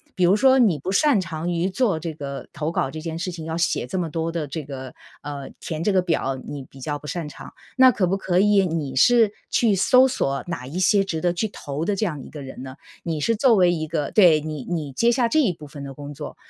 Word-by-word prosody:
比 185 - +2
如 185 +3 +5
说 265 +3 +5
你 205 -10 +4
不 190 - -4
擅 230 0 +3
长 170 -1 -4
于 175 +2 0
做 200 -4 +1
这 165 0 -5
个 140 -2 -7
投 160 +1 -3
稿 135 - -1
这 155 - -6
件 160 0 -5
事 180 +2 -3
情， 165 -2 -7
要 160 - -3
写 165 -7 0
这 185 - -4
么 170 -3 -1
多 165 +2 -3
的 160 -3 -2
这 150 +3 -5
个 130 -2 -8 0.3
呃， 140 -2 -6
填 160 -2 -4
这 200 +4 +1
个 185 - +4
表 160 -6 -1
你 145 -1 -6
比 135 - -14
较 145 +2 -3
不 150 - -11
擅 165 -2 -4
长。 145 - -11 0.2
那 260 0 +8
可 210 -6 +1
不 190 +2 0
可 180 -2 -1
以 200 0 +4
你 150 -6 -3
是 230 - +5 0.2
去 225 -4 +2
搜 255 +7 +5
索 140 - -1
哪 160 -8 -5
一 150 +7 -6
些 195 +2 +3
值 160 -4 -3
得 175 - +2
去 220 +5 -1
投 150 -5 -5
的 205 - 0
这 215 - 0
样 150 -8 -3
一 - - -11
个 150 - -9
人 130 -1 -9
呢， 130 0 -8 0.3
你 160 -3 -3
是 230 - +2
作 245 -1 +5
为 180 -3 +4
一 155 -2 -2
个 150 -3 -2
对， 170 -7 +5
你 155 -3 -6
你 155 -5 -3
接 230 - +2
下 240 -1 +2
这 310 - +3
一 235 -12 +2
部 155 -2 -12
分 140 -1 -9
的 135 - -7
工 145 +1 -8
作。 145 +1 -8
165 Hz, 285 characters per minute, -23 LUFS, 145-195 Hz, 0.3 s, 那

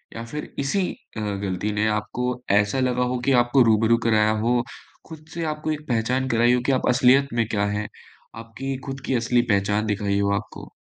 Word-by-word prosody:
या 115 - -5
फिर 150 +5 -7
इसी 180 +7 0 0.3
अ, - - -2
गलती 100 -1 -2
ने 105 +1 0
आपको 125 +4 -2
ऐसा 105 +6 +2
लगा 125 -1 +1
हो - - -1
कि 135 - +3
आपको 120 +2 +2
रूबरू 115 +1 +3
कराया 110 -1 +3
हो, 120 0 +2 0.5
खुद 155 -1 -11
से 170 0 -4
आपको 155 +1 -4
एक 150 0 -5
पहचान 125 +2 0
कराई 120 +1 +3
हो 125 - +1
कि 140 - +2
आप 130 - 0
असलियत 130 +2 +4
में 115 -1 +1
क्या 100 -1 +1
हैं, 105 +1 -2 0.5
आपकी 115 +4 -6
खुद 135 -1 -6
की 130 - 0
असली 120 +1 +2
पहचान 105 +1 +1
दिखाई 100 -1 -1
हो 100 0 +1
आपको? 105 +1 -7
120 Hz, 200 wpm, -23 LUFS, 105-130 Hz, 0.5 s, असलियत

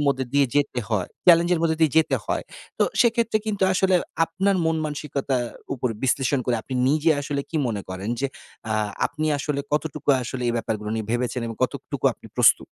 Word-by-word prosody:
মধ্যে 135 -1 +1
দিয়ে 140 -1 +4
যেতে 145 -3 +1
হয়। 105 -6 -1 0.2
চেলেঞ্জ 170 0 +7
এর 165 - -1
মধ্যে 160 -1 +2
দিয়ে 155 -4 +4
যেতে 160 - +4
হয়। - - -1 0.4
তো - - +4 0.2
সেক্ষেত্রে 230 -2 +3
কিন্তু 205 -3 -1
আসলে 190 0 +2 0.3
আপনার 195 +4 0
মন 160 0 +1
মানসিকতার 140 -4 -2 0.3
উপর 125 -1 -1 0.2
বিশ্লেষণ 135 +2 +1
করে 120 -2 +2
আপনি 130 - -6
নিজে 155 +3 +3
আসলে 140 0 -2
কি 165 - -2
মনে 105 -4 -2
করেন 95 +2 -5
যে 140 - +1 0.4
আ - - +2 0.3
আপনি 155 +1 -3
আসলে 145 0 -2
কতটুকু 150 -1 -2
আসলে 125 +1 -5
এই - - +1
ব্যাপারগুলো 105 -2 -3
নিয়ে 110 -2 -3
ভেবেছেন 125 0 -1
এবং 115 -1 -6
কতটুকু 125 - -3
আপনি - - -15
প্রস্তুত? - - +5
140 Hz, 190 wpm, -24 LUFS, 125-160 Hz, 0.4 s, চেলেঞ্জ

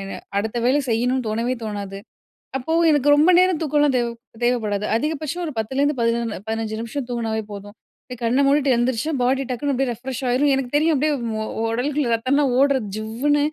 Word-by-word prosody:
எ - - -7 0.2
அடுத்த 220 +3 -1
வேலை 270 +4 +3
செய்யணுனு 250 +2 0
தோணவே 230 +4 -1
தோணாது. 200 -2 -5 0.6
அப்போ 270 +5 -3 0.2
எனக்கு 290 -1 +2
ரொம்ப 315 +5 +5
நேரம் 365 -3 +3
தூக்கன்லாம் 295 -3 +2
தேவ 240 - +1 0.4
தேவப்படாது. 215 -4 0
அதிகபட்சம் 310 +4 -2
ஒரு 305 - -4
10- 220 +4 -3
லருந்து 285 0 +2
பதின 230 -1 0
15- 220 -1 -2
நிமிஷம் 240 +3 -4
தூங்குனாவே 225 -2 -2
போதும். 205 +1 -9 0.3
அப்டே 250 - -8
கண்ண 250 +4 +2
மூடிட்டு 280 -1 +3
எந்திரிச்சா, 245 +5 0
பாடி 260 +2 +2
டக்குன்னு 280 +3 -1
அப்டியே 265 0 0
ரெஃப்ரெஷ் 250 +2 -6
ஆயிரும். 275 +3 +3
எனக்கு 265 -2 -2
தெரியும். 315 +2 +3
அப்டியே 300 +3 +1 0.3
ஒ - - -3 0.3
உடலுக்குள்ள 270 +3 -1
ரத்தம்லாம் 260 +3 +1
ஓட்றத் 270 -6 +2
ஜிவ்வுன்னு. 255 +7 0
255 Hz, 175 wpm, -22 LUFS, 230-285 Hz, 0.6 s, ரொம்ப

